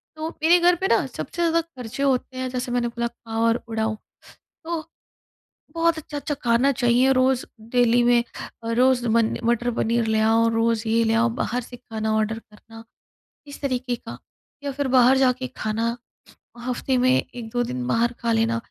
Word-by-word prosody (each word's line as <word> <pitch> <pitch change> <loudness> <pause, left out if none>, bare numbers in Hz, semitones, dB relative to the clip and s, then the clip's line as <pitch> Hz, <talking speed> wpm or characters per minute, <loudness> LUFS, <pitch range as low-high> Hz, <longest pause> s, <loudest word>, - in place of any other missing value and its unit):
तो 315 +1 -4
मेरे 345 +2 +6
घर 350 +1 +4
पे 380 +3 -1
ना - - +3
सबसे - - -7
ज़्यादा 335 0 +3
खर्चे 265 -5 -7
होते 260 -1 0
हैं 255 0 -2
जैसे 250 0 -4
मैंने 240 -1 0
बोला 235 0 -2
खाओ 225 -1 -6
और 230 +1 +1
उड़ाओ। 220 -1 -1 0.7
तो, 325 -1 -3 0.9
बहुत 335 0 +2
अच्छा-अच्छा 295 -1 -4
खाना 240 +4 +3
चाहिए 245 +1 +3
रोज़ 255 0 +2 0.3
डेली 245 -1 +4
में। 240 0 +4 0.4
अ, 230 - -3
रोज़ 250 +1 +3
मने 225 0 +2
मटर-पनीर 235 -1 0
ले 220 0 +2
आओ, 225 +1 +3
रोज़ 225 0 0
ये 230 +1 +3
ले 225 - +1
आओ 230 +1 +3
बाहर 245 +2 -1
से 245 +1 -11
खाना 220 -2 -3
ऑर्डर 220 +1 0
करना, 225 +1 -15 0.6
इस 285 - -10
तरीके 255 -3 -2
का - - -10 0.5
या 285 - -1
फिर 280 0 -2
बाहर 255 0 +5
जाके 255 -1 +2
खाना। 230 +2 -1 0.7
हफ़्ते 255 +1 -1
में 255 +1 +3 0.2
1-2 245 0 -3
दिन 125 - -4
बाहर 235 - +1
खा 235 -1 0
लेना 225 +1 +1
240 Hz, 175 wpm, -23 LUFS, 230-260 Hz, 0.9 s, मेरे